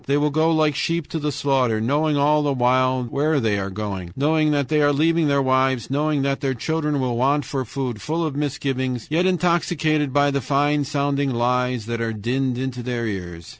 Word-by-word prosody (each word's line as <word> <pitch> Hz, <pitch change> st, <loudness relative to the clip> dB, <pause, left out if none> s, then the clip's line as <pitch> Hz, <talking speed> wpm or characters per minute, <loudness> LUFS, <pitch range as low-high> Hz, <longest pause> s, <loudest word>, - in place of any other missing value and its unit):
They 140 Hz, +1 st, +2 dB
will 150 Hz, 0 st, +1 dB
go 155 Hz, +2 st, +2 dB
like 155 Hz, -2 st, +2 dB
sheep 165 Hz, +3 st, -1 dB
to 160 Hz, -, -3 dB
the 150 Hz, 0 st, -2 dB
slaughter, 135 Hz, -5 st, +1 dB
knowing 145 Hz, +6 st, +1 dB
all 150 Hz, +1 st, +3 dB
the 145 Hz, -1 st, 0 dB
while 130 Hz, 0 st, +2 dB
where 145 Hz, +5 st, 0 dB
they 110 Hz, -5 st, 0 dB
are 100 Hz, 0 st, -3 dB
going, 95 Hz, -3 st, -5 dB
knowing 155 Hz, +2 st, +2 dB
that 145 Hz, -3 st, 0 dB
they 155 Hz, -1 st, +2 dB
are 145 Hz, 0 st, +4 dB
leaving 160 Hz, +2 st, +2 dB
their 140 Hz, -1 st, +2 dB
wives, 130 Hz, -1 st, +1 dB
knowing 145 Hz, 0 st, 0 dB
that 135 Hz, 0 st, -1 dB
their 135 Hz, -2 st, -1 dB
children 150 Hz, +2 st, -1 dB
will 125 Hz, -2 st, -1 dB
want 140 Hz, +3 st, +1 dB
for 135 Hz, +1 st, -3 dB
food, 125 Hz, -3 st, -4 dB
full 165 Hz, +6 st, -2 dB
of 150 Hz, -3 st, -3 dB
misgivings, 130 Hz, -4 st, -2 dB
yet 175 Hz, +4 st, +2 dB
intoxicated 165 Hz, -5 st, +1 dB
by 145 Hz, +1 st, +3 dB
the 140 Hz, 0 st, -1 dB
fine 145 Hz, +2 st, +1 dB
sounding 140 Hz, 0 st, 0 dB
lies 125 Hz, -1 st, 0 dB
that 115 Hz, 0 st, -3 dB
are 115 Hz, -1 st, -2 dB
dinned 125 Hz, +4 st, -1 dB
into 130 Hz, -1 st, -4 dB
their 120 Hz, -1 st, -3 dB
ears. 90 Hz, -5 st, -6 dB
140 Hz, 205 wpm, -22 LUFS, 125-150 Hz, -, are